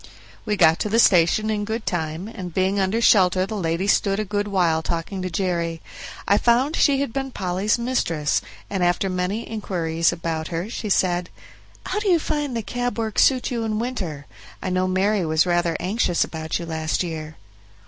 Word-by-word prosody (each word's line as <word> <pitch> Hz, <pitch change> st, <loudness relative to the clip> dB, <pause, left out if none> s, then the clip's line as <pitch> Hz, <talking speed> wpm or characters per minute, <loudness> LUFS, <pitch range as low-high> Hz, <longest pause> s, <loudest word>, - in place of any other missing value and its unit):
We 210 Hz, -1 st, 0 dB
got 160 Hz, -2 st, +5 dB
to 210 Hz, -, -1 dB
the 225 Hz, -, +1 dB
station 210 Hz, +1 st, +4 dB
in 210 Hz, -1 st, -1 dB
good 220 Hz, +2 st, -4 dB
time, 160 Hz, +1 st, -3 dB
and 185 Hz, -5 st, -7 dB
being 190 Hz, +1 st, +1 dB
under 195 Hz, +4 st, +1 dB
shelter 185 Hz, -4 st, +4 dB
the 200 Hz, -, -6 dB
lady 170 Hz, -1 st, -1 dB
stood 200 Hz, 0 st, +2 dB
a 215 Hz, -, -1 dB
good 205 Hz, +1 st, -2 dB
while 175 Hz, -5 st, +2 dB
talking 170 Hz, +4 st, -3 dB
to 185 Hz, -, -3 dB
Jerry. 170 Hz, -2 st, -1 dB, 0.5 s
I 200 Hz, -, +4 dB
found 255 Hz, +6 st, +2 dB
she 280 Hz, -2 st, +3 dB
had 280 Hz, -5 st, -3 dB
been 270 Hz, 0 st, -2 dB
Polly's 190 Hz, -1 st, 0 dB
mistress, 175 Hz, -, 0 dB, 0.3 s
and 195 Hz, -3 st, -2 dB
after 175 Hz, +2 st, +1 dB
many 185 Hz, +5 st, -2 dB
inquiries 170 Hz, -6 st, 0 dB
about 165 Hz, -2 st, -3 dB
her 175 Hz, +5 st, -4 dB
she 215 Hz, -, -4 dB
said: 180 Hz, -2 st, +1 dB, 0.6 s
"How 390 Hz, -, -1 dB
do 420 Hz, -, -3 dB
you 350 Hz, -, +5 dB
find 295 Hz, -5 st, -2 dB
the 225 Hz, -, -3 dB
cab 245 Hz, +3 st, -3 dB
work 220 Hz, -2 st, -1 dB
suit 260 Hz, -1 st, +3 dB
you 235 Hz, -2 st, -1 dB
in 215 Hz, -1 st, -1 dB
winter? 190 Hz, -, -4 dB, 0.3 s
I 185 Hz, -, -3 dB
know 185 Hz, 0 st, +1 dB
Mary 190 Hz, +2 st, +1 dB
was 160 Hz, +1 st, +2 dB
rather 175 Hz, -2 st, +1 dB
anxious 185 Hz, -2 st, +1 dB
about 160 Hz, -1 st, -4 dB
you 170 Hz, -, -6 dB
last 160 Hz, +1 st, -1 dB
year." 160 Hz, -2 st, -6 dB
190 Hz, 190 wpm, -23 LUFS, 170-220 Hz, 0.6 s, got